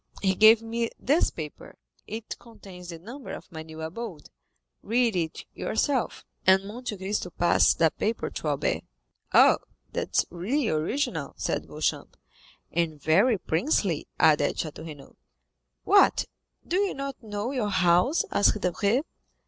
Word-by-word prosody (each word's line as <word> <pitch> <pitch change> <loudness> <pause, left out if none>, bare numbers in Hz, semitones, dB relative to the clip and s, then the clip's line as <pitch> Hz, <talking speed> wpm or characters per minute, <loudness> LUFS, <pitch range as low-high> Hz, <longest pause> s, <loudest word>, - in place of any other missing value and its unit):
He 190 -1 +3
gave 220 +3 +7
me 230 0 -2
this 295 +7 +2
paper; 155 -3 -9 0.3
it 220 +1 -6
contains 190 -6 -12
the 170 - -6
number 235 - -9
of - - -10
my 160 -1 -7
new 160 0 -9
abode; 175 -1 -7 0.5
read 230 -1 +1
it 165 -3 -3
yourself," 260 +2 -1 0.2
and 190 +1 +5
Monte 220 +1 -6
Cristo 190 -1 -2
passed 175 0 +3
a 160 - +5
paper 225 +2 -2
to - - -5
Albert. 145 -2 0 0.5
"Ah, - - +6 0.3
that - - -3
is - - +4
really 220 - -1
original," 160 - -1
said - - -2
Beauchamp. - - -3 0.5
"And 165 -3 -1
very 195 - +3
princely," 180 - 0
added 150 -2 +4
Château 160 0 -5
Renaud. 145 -3 -12 0.7
"What, 405 - +5 0.4
do 355 - 0
you 400 -1 0
not 275 -1 -5
know 210 +2 -4
your 245 -7 -1
house?" 180 - +3
asked 205 +1 +3
Debray. 200 - +1
200 Hz, 140 wpm, -27 LUFS, 165-235 Hz, 0.7 s, gave